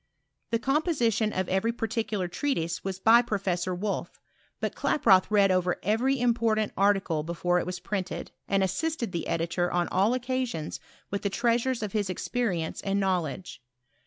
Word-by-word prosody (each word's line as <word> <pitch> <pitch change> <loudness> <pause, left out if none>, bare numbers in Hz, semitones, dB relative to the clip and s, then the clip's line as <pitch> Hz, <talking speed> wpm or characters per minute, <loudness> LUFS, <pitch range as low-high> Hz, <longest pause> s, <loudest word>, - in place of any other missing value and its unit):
The 230 - +2
compo 300 +8 +1
sition 225 -5 +1
of 185 - -1
every 190 +5 +1
particular 225 -4 -2
treatise 175 - -2
was 190 -1 -3
by 225 +4 +6
Professor 185 -5 -1
Wolff; 200 +3 -3 0.4
but - - -2
Klaproth 190 -10 +3
read 200 -2 +4
over 180 -1 +1
every 245 +7 +1
important 230 -3 +1
ar 200 +1 +4
ticle 165 -6 -2
before 175 +2 0
it - - -4
was 180 0 -4
printed, 190 -3 -4 0.2
and 195 -1 +2
assisted 235 - -1
the 170 -2 -3
editor 170 +1 -1
on 175 0 +1
all 200 +6 +2
occasions 255 -9 -3 0.3
with 200 - -2
the 200 - 0
treasures 235 +2 +1
of 210 - -3
his 205 -2 -1
experience 185 -3 -2
and 200 0 0
knowledge. 180 -5 -2
200 Hz, 160 wpm, -28 LUFS, 180-235 Hz, 0.4 s, by